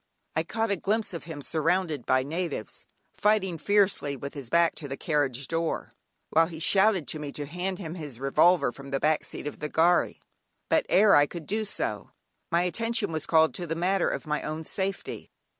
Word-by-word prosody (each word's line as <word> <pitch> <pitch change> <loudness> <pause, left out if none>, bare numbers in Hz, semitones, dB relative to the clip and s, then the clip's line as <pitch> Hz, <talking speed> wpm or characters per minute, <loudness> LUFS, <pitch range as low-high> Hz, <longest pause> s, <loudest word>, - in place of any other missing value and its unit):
I 160 - +2
caught 225 +6 -2
a - - +3
glimpse 210 +2 -1
of 170 - -6
him 155 -4 -7
surrounded 160 -2 0
by 130 0 +3
natives, 160 -5 -4 0.3
fighting 195 -5 +1
fiercely 200 -6 +2
with 140 +2 -7
his 140 -5 -7
back 170 +4 +4
to 145 - -6
the 135 0 -5
carriage 140 -4 0
door, 165 0 -2 0.4
while 165 +1 +4
he 165 -2 -8
shouted 190 - +3
to 155 - -2
me 145 -1 -5
to 145 - -5
hand 180 +5 -3
him 165 -4 -6
his 150 -8 -7
revolver 150 +2 +3
from 140 +2 -11
the 135 0 -1
back 155 +2 +2
seat - - -7
of 150 - -6
the 150 - -3
gharry. 170 +3 +2 0.5
But - - +2
ere 205 +2 +6
I 145 0 +5
could 170 -1 -8
do 215 +5 -1
so, 210 - -2 0.4
my 170 0 +3
attention 225 +1 0
was 155 -2 -3
called 160 -1 +4
to 175 - -3
the 165 - -2
matter 185 +3 +1
of - - -4
my 150 -1 -1
own 155 +1 -4
safety. 195 +4 -3
165 Hz, 200 wpm, -27 LUFS, 150-185 Hz, 0.5 s, ere